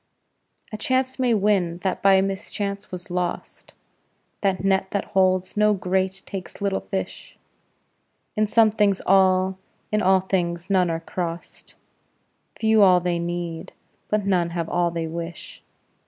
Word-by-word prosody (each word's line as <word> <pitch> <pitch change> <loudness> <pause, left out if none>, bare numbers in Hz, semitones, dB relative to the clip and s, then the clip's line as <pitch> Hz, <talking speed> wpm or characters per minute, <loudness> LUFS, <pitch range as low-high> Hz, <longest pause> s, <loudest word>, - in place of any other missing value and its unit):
A - - -3
chance 260 +3 0
may 245 -3 +3
win 195 -5 +1
that 190 - -1
by 195 -1 +5
mischance 200 +1 -4
was 180 +1 -8
lost; 180 -1 -4 0.7
That 195 -2 0
net 190 0 +1
that 200 - -2
holds 185 -1 +2
no 210 0 +3
great 190 +1 -1
takes 190 -2 -7
little 200 -1 0
fish; 95 -1 -6 1.0
In 215 0 +2
some 220 0 +4
things 205 -3 +2
all, 190 0 +3 0.3
in 215 0 +1
all 190 0 +4
things 175 -1 -2
none 185 -2 +3
are 165 0 -2
crost; 170 0 -6 0.8
Few 220 -1 +4
all 185 -2 +6
they 175 -1 -1
need, 170 -1 -4 0.4
but 210 -1 0
none 180 -3 +1
have 165 -1 -2
all 175 0 +1
they 165 -1 -3
wish. 165 +1 -7
190 Hz, 140 wpm, -23 LUFS, 175-200 Hz, 1.0 s, all